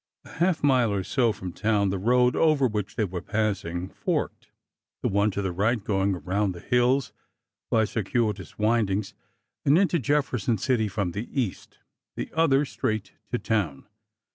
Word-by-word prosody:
A - - -13
half 170 0 0
mile 130 -6 +4
or 100 -2 -1
so 120 +2 +2
from 95 -4 -7
town 105 -2 +1
the 95 - -2
road 125 +4 +3
over 155 -4 +3
which 105 -5 -2
they 110 - +1
were 90 -2 -5
passing 95 -5 -2
forked— - - -3 0.5
the - - +2
one 100 +2 +2
to 100 0 -3
the 95 - -1
right 105 +5 0
going 100 -2 +1
around 95 +4 -1
the 85 - -9
hills 125 +1 +1 0.6
by 110 -1 +3
circuitous 105 -3 -2
wind 110 0 +2
ings 100 +1 -2 0.5
and 145 +3 +5
into 180 -3 +3
Jefferson 130 -4 0
City 115 0 +1
from 100 -3 -2
the 105 +7 -5
east— 115 -8 -4 0.4
the - - -5
other, 150 -3 +3
straight 110 -7 -3 0.2
to 120 - 0
town. 100 - -1
110 Hz, 165 wpm, -26 LUFS, 95-125 Hz, 0.6 s, and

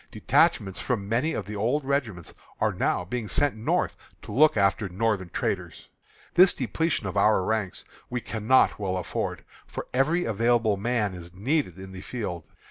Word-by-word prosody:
Detachments 95 -2 +2
from 110 -6 -2
many 120 +9 +1
of 100 - -3
the 105 +2 -6
old 125 +8 0
regiments 120 - -2 0.3
are - - +1
now 90 - 0
being 115 +3 -4
sent 145 +4 +2
North 110 +1 0 0.3
to - - -9
look 150 -2 +4
after 100 0 +2
Northern 100 -1 -1
traitors. - - -3 0.4
This 185 +1 +6
depletion 140 +2 -1
of 95 - -4
our 100 -1 +4
ranks 105 -2 -2 0.2
we 125 - -2
cannot 115 +2 +2
well 95 -2 -1
afford, 90 - -3 0.2
for - - -6
every 155 +7 +2
available 115 0 +2
man 105 -1 -1
is 85 -1 -10
needed 120 - 0
in 95 0 -9
the 95 -1 -8
field. 90 -10 -5
110 Hz, 165 wpm, -26 LUFS, 95-125 Hz, 0.4 s, This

